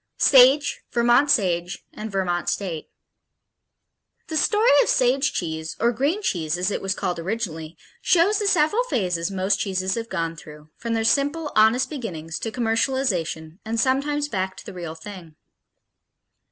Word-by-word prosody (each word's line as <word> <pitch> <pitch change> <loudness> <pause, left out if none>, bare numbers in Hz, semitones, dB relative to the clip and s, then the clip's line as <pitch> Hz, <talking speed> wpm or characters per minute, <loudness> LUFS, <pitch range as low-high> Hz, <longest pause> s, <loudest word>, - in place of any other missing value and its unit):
Sage, 270 +2 +5
Vermont 240 +4 +3
Sage 180 -8 0
and 215 0 -7
Vermont 180 -3 -1
State 175 -6 -4 1.4
The 320 - -4
story 425 +8 +3
of - - 0
Sage 260 +3 +2
cheese, 160 -2 -4
or 235 +1 +3
green 285 - -1
cheese 160 - -1
as 180 +3 -1
it - - -3
was 195 +1 -2
called 175 -2 -3
originally, 165 -4 -4 0.2
shows 375 +4 +3
the 415 - 0
several 390 +5 +3
phases 180 - -1
most 195 +1 0
cheeses 190 -1 -1
have 230 0 -4
gone 165 -3 -3
through, 150 0 -13
from 230 0 -3
their 225 - 0
simple, 290 +6 +1
honest 220 +4 +4
beginnings 165 - -6
to 225 - -4
commercialization, 225 -9 -1
and 225 +1 -3
sometimes 285 +4 0
back 190 -6 -3
to - - -11
the - - -9
real 170 -3 -7
thing. 165 -2 -11
215 Hz, 155 wpm, -23 LUFS, 175-270 Hz, 1.4 s, Sage